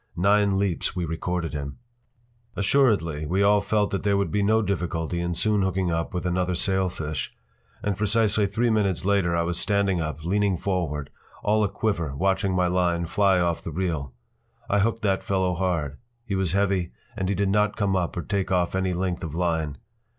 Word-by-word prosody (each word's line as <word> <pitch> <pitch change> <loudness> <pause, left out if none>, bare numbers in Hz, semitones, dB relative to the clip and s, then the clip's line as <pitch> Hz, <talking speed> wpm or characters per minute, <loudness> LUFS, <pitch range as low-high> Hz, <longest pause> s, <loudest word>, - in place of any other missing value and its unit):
Nine 100 +1 +3
leaps 95 -4 -1
we 90 -2 -1
recorded 85 0 -3
him! 70 -1 -5 0.8
Assuredly 95 - +2
we 95 +5 +2
all 105 0 +4
felt 105 -1 +1
that 95 - -1
there 100 -1 +2
would 100 - 0
be 105 - +1
no 110 +2 +3
difficulty 85 -3 -2
in 85 0 -2
soon 105 +4 +2
hooking 95 -1 0
up 85 0 -1
with 90 -1 -3
another 90 0 0
sailfish. 90 -5 -1 0.5
And 105 -1 0
precisely 105 0 +2
three 115 +4 +1
minutes 100 -5 +1
later 95 -4 +2
I 85 - +1
was 85 +1 -2
standing 100 -4 +1
up, 75 0 -4
leaning 100 0 +1
forward, 80 -7 -2 0.3
all 105 +1 +3
aquiver, 95 -7 -1
watching 95 +3 +1
my 90 0 +2
line 90 -1 +1
fly 95 +2 +3
off 85 -2 0
the - - -6
reel. 80 -5 -2 0.6
I 100 - +2
hooked 115 +2 0
that 95 -2 +1
fellow 95 -2 0
hard. 85 -6 -1 0.3
He 105 - -4
was 95 -3 0
heavy, 95 -3 +1 0.2
and 95 -1 -2
he 100 - +1
did 100 +1 +1
not 105 +1 +2
come 100 -3 +1
up 90 -2 -1
or 85 - -2
take 100 -2 -2
off 90 -2 +1
any 95 -1 0
length 90 -1 -2
of 80 -2 -5
line. 80 -4 -1
95 Hz, 185 wpm, -25 LUFS, 85-100 Hz, 0.8 s, all